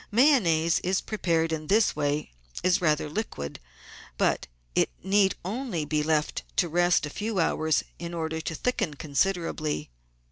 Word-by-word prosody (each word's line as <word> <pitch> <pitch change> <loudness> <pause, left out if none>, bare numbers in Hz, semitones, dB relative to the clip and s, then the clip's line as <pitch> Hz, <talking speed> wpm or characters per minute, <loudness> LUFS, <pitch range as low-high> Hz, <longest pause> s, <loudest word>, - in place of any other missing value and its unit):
Mayonnaise 195 - +4 0.3
prepared 165 -6 0
in 155 -1 -3
this 215 +4 +3
way 145 - -1 0.3
is 185 +1 +3
rather 155 -2 +2
liquid, 150 - -4 0.6
but - - +1 0.3
it - - +3
need 195 0 +3
only 205 - -2
be 150 0 0
left 155 0 0
to 175 - +3
rest 175 0 +3
a - - -5
few 215 +3 -3
hours 160 -2 +2 0.2
in 170 0 -5
order 160 -1 -2
to 160 - -4
thicken 175 -8 -1
con 145 +1 -9
siderably. 155 - 0
165 Hz, 145 wpm, -27 LUFS, 155-195 Hz, 0.6 s, Mayonnaise